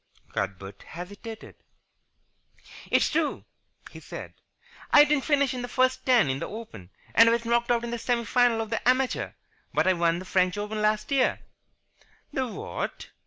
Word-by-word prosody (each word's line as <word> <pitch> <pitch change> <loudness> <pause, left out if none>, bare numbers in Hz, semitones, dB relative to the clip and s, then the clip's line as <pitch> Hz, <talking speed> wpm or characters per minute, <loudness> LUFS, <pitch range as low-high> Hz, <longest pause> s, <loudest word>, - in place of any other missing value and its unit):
Cuthbert 95 0 -4
hesitated. 205 +6 -9 1.4
"It's - - +3
true," 310 -1 -1 0.5
he - - -10
said, - - -9 0.6
"I 295 - +9
didn't 295 -2 +1
finish 280 -3 +2
in 250 - -4
the 245 - -4
first 255 +1 +1
ten 245 - +5
in 135 0 -1
the - - -4
Open, 155 - -9 0.2
and 230 +1 +7
I - - +3
was 235 0 0
knocked 235 0 +1
out 240 -1 +2
in 235 - -4
the 235 - -3
semi 235 0 0
final 240 0 +3
of 220 0 -6
the 230 +2 +1
Amateur, 255 0 +1 0.4
but - - +3
I 185 - +4
won 170 -1 +1
the 185 - -7
French 185 +1 +1
Open 210 +1 -3
last 215 +3 0
year." 270 -2 +2 0.9
"The 260 -1 -1
what?" 230 - -6
230 Hz, 170 wpm, -27 LUFS, 195-255 Hz, 1.4 s, I